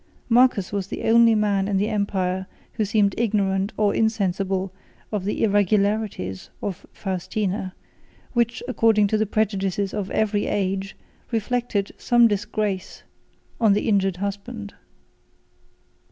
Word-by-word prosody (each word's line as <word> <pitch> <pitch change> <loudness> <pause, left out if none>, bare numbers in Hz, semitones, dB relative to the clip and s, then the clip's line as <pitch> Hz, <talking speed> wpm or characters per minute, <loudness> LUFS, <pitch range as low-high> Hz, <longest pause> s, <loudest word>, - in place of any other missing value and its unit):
Marcus 240 -5 +4
was 200 -2 -2
the - - -6
only 230 0 +5
man 200 -2 +1
in 200 -1 +1
the 205 +2 +1
empire 190 -3 -1 0.3
who 220 - 0
seemed 205 -1 +2
ignorant 200 -3 +1
or 210 -1 +2
insensible 195 -3 0 0.4
of 205 -3 -2
the 205 - -1
irregularities 205 - +1
of 195 -4 -5
Faustina; 190 0 -3 0.6
which, 235 0 0
according 225 -4 +3
to 215 +2 +1
the 215 - +1
prejudices 195 -2 -1
of 205 -2 -3
every 210 -1 0
age, 195 0 -2 0.3
reflected 225 -2 -1
some 240 -1 +5
disgrace 205 -2 -2 0.6
on 220 -4 +5
the 205 - 0
injured 195 -4 +2
husband. 200 +2 -5
205 Hz, 125 wpm, -23 LUFS, 195-220 Hz, 0.6 s, only